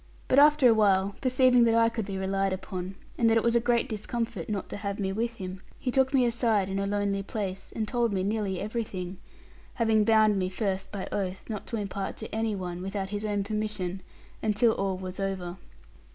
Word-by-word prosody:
But, 260 - +5
after 295 -2 +7
awhile, 200 -3 +4
perceiving 255 -1 +5
that 230 -1 +3
I 230 0 +5
could 230 -2 -2
be 195 -1 -3
relied 195 0 0
upon, 185 0 -5 0.2
and 230 - +5
that 225 - +4
it 225 - +2
was 235 0 +2
a - - +6
great 240 +1 +1
discomfort 230 +1 -3
not 205 -3 -2
to - - -5
have 200 -1 -3
me 195 -2 -1
with 230 +3 -1
him, 185 -2 -7 0.2
he 250 - -2
took 265 +1 +3
me 265 -3 +4
aside 230 -5 +1
in 195 0 -1
a 200 - -1
lonely 200 -1 0
place, 195 -2 -5
and 220 -1 -1
told 235 -1 +1
me 190 -2 0
nearly 200 -2 -1
everything; 195 -4 -4 0.6
having 220 -3 +3
bound 215 -2 +4
me 185 -1 0
first 195 -1 -2
by 200 -2 -4
oath, 190 -2 -3
not 210 - -5
to 230 - -3
impart 200 -1 -4
to 220 - -8
any 220 -1 0
one, 180 -2 -5
without 195 0 -3
his 205 +1 -3
own 205 -2 0
permission, 205 -3 -3 0.4
until 220 +2 +3
all 195 -3 -1
was 185 0 -6
over. 190 -2 -3
205 Hz, 210 wpm, -28 LUFS, 190-230 Hz, 0.6 s, after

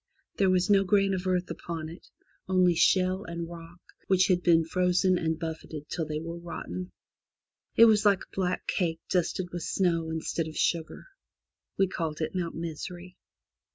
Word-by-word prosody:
There 190 - +3
was 185 +1 +2
no 200 -2 +5
grain 195 0 +2
of 185 0 -3
earth 180 -1 0
upon 165 -2 -5
it, 165 +4 -11 0.4
only 185 -1 +4
shale 185 +3 +3
and 170 -2 -5
rock, 170 0 -11 0.3
which 185 0 +3
had 180 -1 +3
been 165 -2 +4
frozen 180 +1 +2
and 160 -1 -1
buffeted 160 -2 -6
till 165 -3 -3
they 150 0 -3
were 165 +1 -6
rotten. 180 +1 -6 0.8
It 230 - +8
was 215 -2 +5
like 200 -2 +4
a - - -18
black 185 -2 -1
cake 165 -3 -1
dusted 180 0 0
with 175 - -5
snow 165 -4 0
instead 160 0 -2
of 155 - -8
sugar. 165 -2 -1 0.7
We 195 - +4
called 160 -4 -3
it 155 - -2
Mount 175 -3 -3
Misery. 175 +2 -6
175 Hz, 170 wpm, -28 LUFS, 165-185 Hz, 0.8 s, It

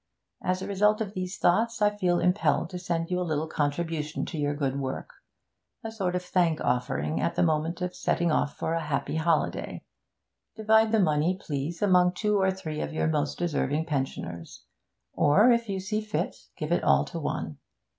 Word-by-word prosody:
As 185 +1 -1
a - - -5
result 210 +2 +2
of 210 -3 -3
these 185 0 -4
thoughts, 225 +6 +2
I 210 0 +3
feel 180 -3 +1
impelled 180 -2 +1
to 180 - -5
send 170 -1 -2
you 180 - +1
a - - -1
little 160 -3 -1
contribution 155 0 -2
to 160 - -6
your 145 0 0
good 140 -2 -1
work 135 -1 -4 0.7
a 225 - -5
sort 190 -5 -2
of 180 - -1
thank 175 -3 +1
offering 85 -11 -1
at 170 - 0
the - - +2
moment 160 +2 0
of 180 0 -2
setting 170 -1 0
off 145 - 0
for 160 - -1
a 165 - 0
happy 150 0 -2
holiday. 165 +1 0 0.7
Divide 220 0 +3
the 220 - +3
money, 165 0 +2
please, 155 +4 -4
among 180 -2 +4
two 210 0 +1
or 190 - +3
three 160 -5 -4
of - - -3
your 155 - -1
most 150 -2 0
deserving 160 -2 0
pensioners; 135 - -4 0.5
or, 205 +12 +5
if 235 -2 +1
you 195 -1 -1
see 210 +3 -2
fit, 215 0 -2 0.2
give - - -4
it - - +2
all - - +4
to - - -6
one. - - -4
175 Hz, 190 wpm, -27 LUFS, 155-195 Hz, 0.7 s, or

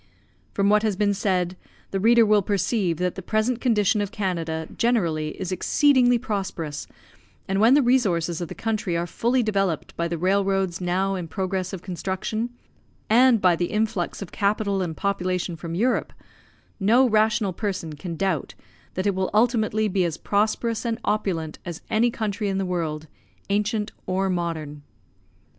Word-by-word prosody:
From 200 0 +2
what 210 +1 +5
has 215 -2 0
been 205 +1 +2
said, 185 -3 0 0.4
the 195 - -1
reader 230 +3 +5
will 210 -1 +4
perceive 195 -2 0
that 180 +1 0
the 190 - -7
present 220 +5 0
condition 210 -4 +2
of 205 -1 -3
Canada 165 -7 -2
generally 170 -11 0
is 185 -1 -3
exceedingly 245 - +4
prosperous, 190 - -4 0.6
and 195 +1 0
when 235 +5 +6
the 290 - +4
resources 180 -10 +1
of 175 - -3
the - - -8
country 215 -6 -1
are 170 - -1
fully 240 +8 +1
developed 195 -7 -1
by 170 - -1
the 170 0 -3
railroads 190 0 +1
now 185 +2 0
in 180 -3 -4
progress 185 +1 -2
of 190 -3 -7
construction, 190 +5 -3 0.6
and 245 0 +6
by 180 -2 +5
the 175 - 0
influx 215 -2 -1
of 185 - -11
capital 200 -1 0
and 165 -3 -3
population 185 -3 -1
from 165 +1 -6
Europe, 240 +7 0 0.7
no 235 +6 +4
rational 215 -3 +2
person 185 -5 -3
can 165 +3 -6
doubt 185 -4 -1 0.4
that 185 - -2
it 200 - +2
will 190 0 -1
ultimately 215 -2 +2
be 190 -2 +1
as 165 -2 -2
prosperous 215 +2 0
and 230 -2 -1
opulent 180 -7 -1
as 170 -2 -6
any 230 +3 +3
country 215 -2 -2
in 195 - -1
the 195 - -1
world, 160 -4 -2 0.5
ancient 210 +1 0 0.2
or 190 +1 0
modern. 160 -4 -3
195 Hz, 165 wpm, -24 LUFS, 175-215 Hz, 0.7 s, when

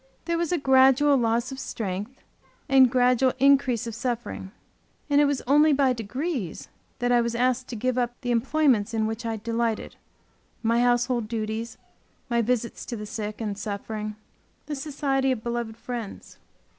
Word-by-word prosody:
There 335 0 0
was 340 -1 -1
a 355 - +2
gradual 270 +1 +5
loss 235 0 +1
of 265 - -7
strength 210 +3 -5 0.4
and 265 -2 +6
gradual 250 +1 +3
increase 270 -4 +3
of 230 - -5
suffering, 235 -4 -4 0.6
and 285 0 +5
it - - +5
was 285 -2 -1
only 295 +3 +5
by 270 -2 +3
degrees 250 - -4 0.3
that 245 0 0
I 240 -1 +5
was 235 0 -2
asked 255 +1 +1
to 240 - -6
give 255 +3 0
up 240 0 -1
the 245 -2 -2
employments 235 -3 +2
in 220 -1 +1
which 225 +2 -3
I'd 220 -2 -4
delighted, 230 -1 -2 0.7
my 230 +1 +2
household 245 -1 +1
duties, 225 +1 -4 0.5
my 235 0 +3
visits 235 0 -1
to 240 - -4
the 210 -1 -6
sick 210 0 -5
and 210 -3 -3
suffering, 210 +1 -5 0.5
the 305 - -5
society 270 -2 0
of 235 -4 -3
beloved 235 -2 -3
friends. 235 -4 -7
240 Hz, 165 wpm, -25 LUFS, 225-265 Hz, 0.7 s, and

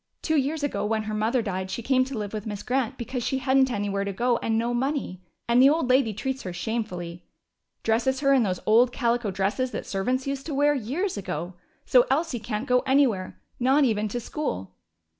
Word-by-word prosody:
Two 315 - +1
years 295 +2 0
ago, 290 - -1
when 220 +1 0
her 215 0 -4
mother 225 +3 +1
died, 190 -2 -3
she 235 - -4
came 255 +1 +3
to 265 -2 -6
live 210 -1 -4
with 215 0 -5
Miss 205 -1 -5
Grant 260 0 -1
because 250 +1 -4
she 265 +3 -1
hadn't 265 0 +3
anywhere 200 -3 -1
to 200 - -3
go 240 +4 +1
and 225 -1 -1
no 235 +2 0
money. 260 -7 -2 0.3
And 235 +1 +5
the 270 - +8
old 290 -4 +1
lady 255 -3 +3
treats 265 +6 -3
her 185 - -5
shamefully. 175 -4 -4 0.6
Dresses 260 +4 +1
her 275 -1 +4
in 265 - +4
those 185 -5 0
old 235 +3 +5
calico 235 -3 0
dresses 195 +7 -1
that - - -5
servants 250 +7 -1
used 275 0 -4
to 300 - -3
wear 290 +1 +4
years 290 - -2
ago. 180 -2 -4 0.3
So 250 -1 +5
Elsie 280 -2 0
can't 215 +1 -4
go 250 0 +4
anywhere, 255 -9 +1 0.2
not 265 +4 +4
even 215 -4 +1
to 240 +4 -3
school." 95 - -4
240 Hz, 210 wpm, -26 LUFS, 210-265 Hz, 0.6 s, the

